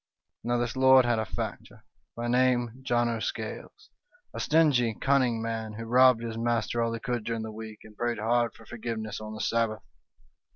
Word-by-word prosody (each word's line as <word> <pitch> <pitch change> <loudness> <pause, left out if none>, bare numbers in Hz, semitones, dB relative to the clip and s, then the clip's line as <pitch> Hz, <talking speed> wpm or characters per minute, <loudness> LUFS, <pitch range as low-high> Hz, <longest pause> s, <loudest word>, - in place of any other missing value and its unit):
"Now 120 +1 0
this 120 0 -2
lord 130 -1 +6
had 120 -2 +1
a 110 - -1
factor, - - -6 0.3
by 120 0 -3
name 125 -1 +1
John 120 -2 +1
o' 115 -1 -2
Scales, - - -6 0.4
a - - -6
stingy, 140 -8 +3
cunning 125 -4 +1
man, 115 -1 -4
who 115 +2 -6
robbed 125 0 +5
his 115 -1 -4
master 120 0 0
all 115 0 0
he 115 - -4
could 120 -1 -3
during 115 0 -3
the 110 - -6
week, 110 0 -9
and 110 -1 -15
prayed 120 +1 -1
hard 115 +2 +1
for - - -16
forgiveness 110 -2 -5
on 110 0 -7
the 110 - -6
Sabbath. 115 -2 0
115 Hz, 190 wpm, -28 LUFS, 110-120 Hz, 0.4 s, lord